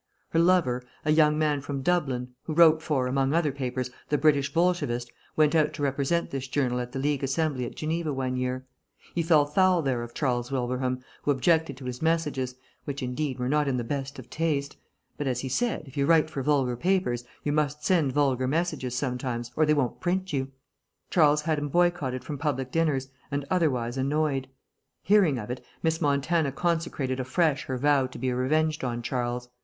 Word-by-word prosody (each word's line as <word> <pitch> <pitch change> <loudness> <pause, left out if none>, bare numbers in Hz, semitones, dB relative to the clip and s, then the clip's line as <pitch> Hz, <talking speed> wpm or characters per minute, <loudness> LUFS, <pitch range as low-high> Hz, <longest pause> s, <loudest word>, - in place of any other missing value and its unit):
Her 165 - +1
lover, 170 -8 +3 0.2
a 155 - +3
young 150 -1 +4
man 150 -2 +1
from 140 -1 -4
Dublin, 135 -7 0 0.2
who 155 - -3
wrote 160 -1 +6
for, 145 -5 0
among 135 +3 +1
other 160 -4 +2
papers, 130 -2 -3 0.2
the 150 - +2
British 140 -1 +3
Bolshevist, 140 -8 0 0.2
went 155 0 +4
out 155 -2 +3
to 145 - -4
represent 140 +5 0
this 135 -1 -4
journal 130 -2 0
at 125 0 -4
the 135 - -5
League 145 0 0
Assembly 135 -2 0
at - - -9
Geneva 160 0 -2
one 130 -2 -2
year. 130 0 -2 0.5
He 170 - 0
fell 160 -3 +4
foul 180 +3 +3
there 130 -3 0
of 120 0 -8
Charles 125 -3 -1
Wilbraham, 125 0 -1 0.2
who - - -3
objected 145 +1 +2
to 130 - -10
his 125 -1 -5
messages, 150 -6 0 0.3
which, 140 -2 -4
indeed, 130 +2 -2
were 125 0 -2
not 150 +2 +2
in 130 -2 +1
the 120 - -1
best 135 +2 -4
of 130 -2 -10
taste; 145 -3 -1 0.4
but, 145 - -1
as 125 -1 -1
he 130 - -4
said, 230 - 0
if 135 - -14
you 140 0 +1
write 160 -1 +4
for 140 - -3
vulgar 135 -3 +1
papers 170 -5 0 0.2
you 145 - 0
must 150 0 -1
send 165 -7 +3
vulgar 130 -2 +1
messages 140 -4 -1
sometimes 125 -2 -3
or 155 -1 +3
they 150 - +5
won't 135 -4 -1
print 185 0 -1
you. 135 -1 0 0.6
Charles 150 -3 +4
had 155 -1 0
him 145 0 -3
boycotted 150 -7 +1
from 145 0 -6
public 135 -3 -2
dinners, 145 -5 0 0.2
and 140 0 -2
otherwise 130 -9 +1
annoyed. 135 0 0 0.6
Hearing 190 -9 +4
of 115 0 -5
it, 125 - -5 0.2
Miss 160 0 +1
Montana 145 +1 +1
consecrated 160 -5 -1
afresh 140 +3 +1
her 130 - -3
vow 140 0 +3
to 130 - -11
be 130 -1 -1
revenged 155 +5 +1
on 120 -2 -2
Charles. 125 0 -2
140 Hz, 195 wpm, -27 LUFS, 130-155 Hz, 0.6 s, wrote